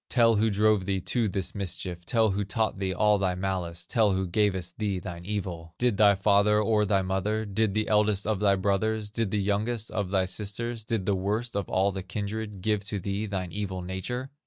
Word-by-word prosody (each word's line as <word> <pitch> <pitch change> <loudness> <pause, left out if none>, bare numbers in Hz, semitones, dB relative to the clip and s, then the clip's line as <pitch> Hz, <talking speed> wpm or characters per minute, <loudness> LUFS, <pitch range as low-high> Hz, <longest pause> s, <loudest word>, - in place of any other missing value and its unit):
Tell 115 -3 +4
who 110 +2 +3
drove 105 -1 +2
thee 95 -1 0
to 115 +5 0
this 95 -1 -2
mischief, 90 -3 -4
Tell 110 -3 +3
who 100 +2 -1
taught 110 0 -1
thee 95 -1 -1
all 105 +2 +3
thy 95 -2 0
malice, 90 -3 -3
Tell 110 -4 +2
who 95 0 0
gavest 95 -1 0
thee 100 -3 0
thine 85 -1 -7
evil! 90 -5 -4
Did 120 -4 +1
thy 105 -1 +6
father, 100 +2 +4
or 105 -1 +2
thy 95 -1 +2
mother, 100 +4 -1
Did 100 0 0
the 110 0 +1
eldest 105 -2 +2
of 105 -2 0
thy 100 -1 +4
brothers, 105 +2 0
Did 115 -1 0
the 105 - 0
youngest 105 +3 -1
of 100 -3 -2
thy 95 -1 +2
sisters, 110 +4 -4
Did 110 -3 -2
the 100 - +2
worst 105 +5 -2
of 100 - -2
all 95 +2 +2
thy 95 0 -4
kindred 105 +1 -5
Give 105 0 0
to 100 -1 -3
thee 100 +3 -3
thine 95 -3 -3
evil 95 -3 -4
nature? 125 +9 -4
100 Hz, 210 wpm, -27 LUFS, 95-110 Hz, -, thy